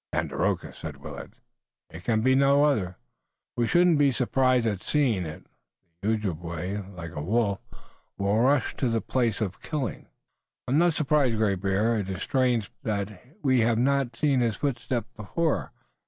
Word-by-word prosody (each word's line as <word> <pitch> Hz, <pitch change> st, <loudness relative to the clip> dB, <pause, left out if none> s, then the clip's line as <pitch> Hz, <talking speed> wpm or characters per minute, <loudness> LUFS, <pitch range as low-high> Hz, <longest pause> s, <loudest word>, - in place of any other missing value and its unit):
"Tandakora," -, -, -1 dB
said -, -, -7 dB
Willet. -, -, -9 dB, 0.6 s
"It 85 Hz, +2 st, -10 dB
can 110 Hz, +1 st, +1 dB
be 130 Hz, +3 st, +4 dB
none 140 Hz, +1 st, +4 dB
other." 105 Hz, -12 st, +1 dB, 0.6 s
"We 120 Hz, -1 st, +1 dB
shouldn't 175 Hz, -1 st, +4 dB
be 140 Hz, -1 st, +5 dB
surprised 130 Hz, -1 st, +2 dB
at 100 Hz, -4 st, -1 dB
seeing 115 Hz, -, +1 dB
it. 75 Hz, -, -9 dB, 0.6 s
The 110 Hz, +3 st, +1 dB
Ojibway, 90 Hz, -2 st, -4 dB, 0.2 s
like 85 Hz, -2 st, -7 dB
a 75 Hz, -, -5 dB
wolf, 100 Hz, +3 st, +1 dB, 0.6 s
will 100 Hz, +2 st, +1 dB
rush 130 Hz, +1 st, +2 dB
to 130 Hz, -, +1 dB
the 115 Hz, -1 st, +1 dB
place 115 Hz, -2 st, 0 dB
of 100 Hz, -3 st, -3 dB
killing." 145 Hz, -7 st, -4 dB, 0.6 s
"I -, -, -2 dB
am 145 Hz, -, +4 dB
not 170 Hz, -2 st, +3 dB
surprised, 140 Hz, -6 st, +2 dB
Great 100 Hz, -4 st, +1 dB
Bear. 105 Hz, +4 st, +1 dB
It 95 Hz, -2 st, -4 dB
is 95 Hz, -2 st, -4 dB
strange, 125 Hz, -5 st, +1 dB
perhaps, 100 Hz, -1 st, -2 dB
that 95 Hz, -, -15 dB, 0.2 s
we 130 Hz, -3 st, +3 dB
have 115 Hz, 0 st, +3 dB
not 135 Hz, -1 st, +1 dB
seen 140 Hz, +1 st, +2 dB
his 115 Hz, -3 st, +1 dB
footsteps 120 Hz, -4 st, -2 dB
before. 145 Hz, -, -1 dB
115 Hz, 170 wpm, -27 LUFS, 100-135 Hz, 0.6 s, be